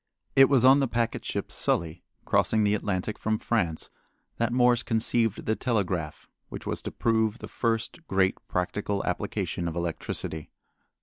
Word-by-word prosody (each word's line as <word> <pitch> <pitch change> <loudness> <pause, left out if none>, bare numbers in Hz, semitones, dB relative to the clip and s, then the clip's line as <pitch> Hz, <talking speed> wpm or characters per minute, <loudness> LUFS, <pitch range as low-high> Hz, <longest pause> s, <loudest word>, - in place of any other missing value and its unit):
It 135 0 +7
was 130 -3 +4
on 135 +2 +7
the 135 - +2
packet 115 -1 -1
ship - - -3
Sully, 85 0 0 0.2
crossing 110 -1 +2
the 105 0 +3
Atlantic 105 0 -2
from 110 0 0
France, 85 -9 -1 0.5
that 115 0 0
Morse 120 -1 +4
conceived 115 -1 0
the 110 - +1
telegraph 95 - -2 0.2
which - - -8
was - - -3
to - - -5
prove 110 -1 +1
the - - -8
first 115 +8 -2
great 95 0 +2
practical 100 +2 -2
application 85 - -2
of 85 - -4
electricity. 80 -2 -4
110 Hz, 150 wpm, -27 LUFS, 90-120 Hz, 0.5 s, It